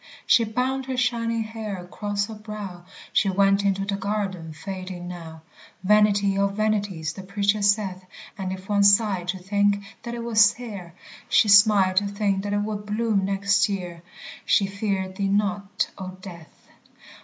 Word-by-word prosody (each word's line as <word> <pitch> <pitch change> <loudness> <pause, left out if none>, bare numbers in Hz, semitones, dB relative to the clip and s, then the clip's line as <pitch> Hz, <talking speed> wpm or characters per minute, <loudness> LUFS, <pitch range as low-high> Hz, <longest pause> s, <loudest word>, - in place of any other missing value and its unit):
She 230 - +4
bound 255 +4 -2
her 260 -1 -3
shining 230 -2 0
hair 220 -2 -6
across 200 +3 -3
her 220 - -9
brow, 210 -5 -8 0.3
She 210 -3 +3
went 195 +1 +3
into 195 0 0
the 200 0 -1
garden 195 -5 -3
fading 185 +1 -7
now; 165 -3 -9 0.4
Vanity 205 -1 +3
of 200 0 +1
vanities 205 -7 -1
the 190 - -8
Preacher 200 +2 0
saith 200 -2 +1 0.3
And 190 -3 -4
if 190 0 -7
one 205 -1 +2
sighed 200 -3 +4
to 185 +1 -2
think 200 +2 +1 0.2
that 235 0 -6
it 235 - -5
was 225 -2 +5
sere, 200 -5 -2 0.3
She 215 - +4
smiled 205 -2 +6
to 205 +1 +3
think 200 -1 -1
that 205 +1 -3
it 205 0 +1
would 210 -1 -5
bloom 210 -2 0
next 200 +1 +2
year! 180 -4 -5 0.4
She 200 - +3
feared 195 -2 -3
thee 200 - 0
not, 200 -1 -1
O 185 -1 -7
Death. 175 -4 -13
200 Hz, 165 wpm, -24 LUFS, 190-210 Hz, 0.4 s, smiled